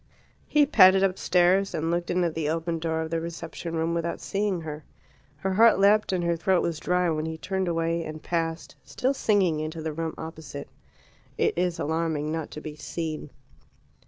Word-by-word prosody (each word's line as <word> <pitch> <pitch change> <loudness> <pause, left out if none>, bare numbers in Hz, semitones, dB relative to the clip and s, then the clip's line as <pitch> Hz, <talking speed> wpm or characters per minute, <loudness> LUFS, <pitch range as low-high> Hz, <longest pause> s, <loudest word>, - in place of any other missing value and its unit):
He 300 -1 +4
padded 190 -9 +6
upstairs, 185 0 +2
and 165 +1 -1
looked 175 0 -1
in 180 0 +1
at 170 -2 0
the 155 -2 -1
open 165 +1 -1
door 160 0 -1
of 160 0 -5
the 165 0 0
reception 165 0 -6
room 165 +1 0
without 170 0 -2
seeing 200 -3 -1
her. 155 -1 -7 0.5
Her 190 +7 -2
heart 225 +4 +6
leapt 205 +2 +4
and 180 -2 0
her 170 0 +1
throat 180 +2 +2
was 165 -3 -2
dry 180 +2 +1
when 155 0 -2
he 160 0 -4
turned 190 +2 -2
away 165 0 0
and 155 0 -7
passed, 165 -1 -2
still 260 +2 -1
singing, 195 - +2
into 155 +1 -4
the 160 -1 -3
room 165 +1 -3
opposite. 155 -3 -8 0.7
It - - +1
is 180 0 0
alarming 160 -1 -1
not 160 -1 -3
to 150 - -8
be 155 -1 -7
seen. 155 0 -5
165 Hz, 190 wpm, -26 LUFS, 160-180 Hz, 0.7 s, padded